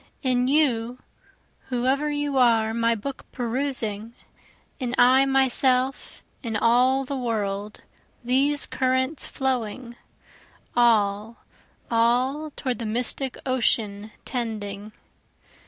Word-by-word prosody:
In 250 -1 +1
you 250 -5 +1 0.7
whoe'er 265 +4 0
you 290 -1 -2
are 225 -3 +3
my 230 0 +1
book 260 +5 -7
perusing, 235 -3 -2 0.6
In 250 -2 -2
I 260 +2 +5
myself, 265 0 +2 0.2
in 230 -4 -4
all 250 +5 +3
the 280 - -4
world, 210 -4 -3 0.4
these 275 +4 +1
currents 260 +3 -1
flowing, 250 -2 -3 0.8
All, 220 -1 +1 0.5
all 250 +6 +1
toward 255 -3 -3
the 230 - -4
mystic 245 +3 -2
ocean 220 -5 0 0.2
tending. 215 -4 -5
245 Hz, 95 wpm, -24 LUFS, 225-265 Hz, 0.8 s, I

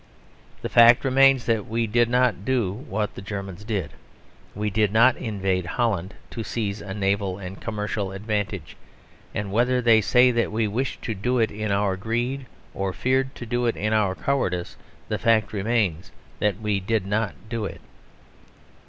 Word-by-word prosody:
The - - -1
fact 120 +2 +6
remains 135 -1 +5
that 110 -3 0
we 115 +1 0
did 120 +2 +2
not 125 -5 +2
do 115 -6 0
what 110 -3 -3
the - - -8
Germans 100 -1 -6
did. 100 -8 -3 0.6
We 105 +1 -2
did 105 0 +2
not 120 +3 +5
invade 95 -5 -2
Holland 100 -6 0 0.2
to 115 - -4
seize 105 0 -3
a 95 -1 -6
naval 100 -2 0
and 95 -1 -8
commercial 105 -3 -3
advantage: 100 -4 -3 0.6
and 105 -2 -3
whether 125 +4 +2
they 115 -2 +5
say 125 +4 +5
that 120 -1 0
we 110 0 0
wished 120 +6 -3
to 115 - -2
do 120 +6 -1
it 115 -2 +2
in 110 0 -3
our 100 -1 +1
greed, 120 +6 -2 0.3
or 95 -1 -2
feared 130 +3 0
to 120 - -7
do 120 +1 0
it 115 - +1
in 105 +1 0
our 105 -4 +2
cowardice, 90 -11 -1 0.3
the - - -2
fact 110 -2 +2
remains 100 -5 0 0.3
that 105 -2 0
we 105 -2 0
did 100 +1 -1
not 105 0 -1
do 115 -1 -3
it. - - -7
110 Hz, 170 wpm, -24 LUFS, 100-120 Hz, 0.6 s, fact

